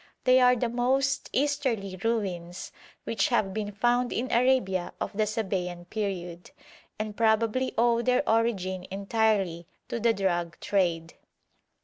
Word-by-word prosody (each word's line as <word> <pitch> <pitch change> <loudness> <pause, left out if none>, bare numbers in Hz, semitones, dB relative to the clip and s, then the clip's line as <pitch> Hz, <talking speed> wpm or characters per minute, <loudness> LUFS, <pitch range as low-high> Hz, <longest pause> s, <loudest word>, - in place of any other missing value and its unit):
They 255 0 +5
are 250 0 +6
the 245 0 0
most 260 +3 0
easterly 255 -9 0
ruins 185 -6 -2 0.3
which 210 -4 0
have 210 -6 +1
been 210 0 -3
found 240 +4 +1
in 250 +2 -2
Arabia 235 -8 +2
of - - -4
the 215 +1 +1
Sabæan 185 -5 -3
period, 180 -5 -4 0.5
and 215 -1 -4
probably 230 +3 +1
owe 235 0 +3
their 250 +3 +1
origin 195 -5 0
entirely 195 -4 0 0.2
to 235 - -2
the 230 +1 +3
drug 175 -4 -1
trade. 170 -4 0
215 Hz, 130 wpm, -27 LUFS, 185-240 Hz, 0.5 s, are